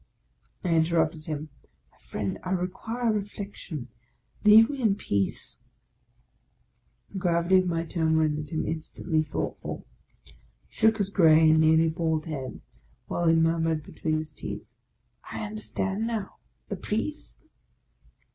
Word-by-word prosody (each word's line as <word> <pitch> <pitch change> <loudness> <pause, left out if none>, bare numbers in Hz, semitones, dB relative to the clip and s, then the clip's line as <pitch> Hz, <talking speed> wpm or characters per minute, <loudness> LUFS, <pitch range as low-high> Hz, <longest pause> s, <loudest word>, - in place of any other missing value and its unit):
I 180 - -1
interrupted 160 -1 +2
him, 155 0 -4 0.2
" - - -41
My - - -30
friend, 100 -2 -4
I 185 - -6
require 225 +6 -1
reflection: 200 - -5 0.5
leave 220 +1 +8
me 280 -1 -5
in 215 -4 +3
peace." 100 - -1 1.5
The 195 - -4
gravity 175 +1 +3
of 185 - 0
my 165 -1 -1
tone 160 -1 +1
rendered 150 -1 0
him 160 - -2
instantly 160 0 -1
thought 155 - -3
ful. - - -6 0.4
He - - -20 0.4
shook 220 0 +3
his 200 -2 -1
grey 160 -4 +6
and 160 0 +5
nearly 160 +1 +5
bald 160 -1 -1
head, 135 -5 -5 0.4
while 175 - -1
he 165 - +6
mur 165 0 +3
mured 160 -2 0
between 155 +1 -2
his 155 0 -4
teeth, - - -6 0.4
" - - -18
I - - -4
understand 210 0 -2
now, 220 -4 -4 0.2
— - - -46
the 200 - -3
Priest 225 +11 -3
165 Hz, 145 wpm, -27 LUFS, 155-200 Hz, 1.5 s, leave